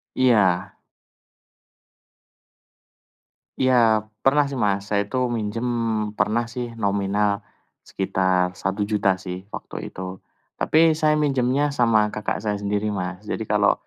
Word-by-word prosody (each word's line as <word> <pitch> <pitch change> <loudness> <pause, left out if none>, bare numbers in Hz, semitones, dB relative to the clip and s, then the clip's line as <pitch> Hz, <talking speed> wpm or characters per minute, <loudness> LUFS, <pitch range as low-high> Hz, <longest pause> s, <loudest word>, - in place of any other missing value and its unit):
Iya. 100 -7 +3 2.8
Iya, 115 -4 +3 0.2
pernah 145 +2 +4
sih 140 - -6
Mas, 100 -1 0
saya 100 - +3
itu 130 - -2 0.2
minjem, 110 +2 -3 0.5
pernah 115 +2 0
sih 120 -1 -5
nominal 100 0 0 0.4
sekitar 95 -1 0
Rp1.000.000 100 0 0
sih 95 +1 -8
waktu - - -7
itu. 95 0 -7 0.4
Tapi 160 0 +4
saya 155 -1 +2
minjemnya 140 0 +1
sama 110 -4 +2
kakak 110 - -2
saya 105 -1 -2
sendiri 105 +1 -1
Mas. 90 +1 -5
Jadi, 110 +1 -4
kalau 105 -1 +4
105 Hz, 110 wpm, -23 LUFS, 100-125 Hz, 2.8 s, pernah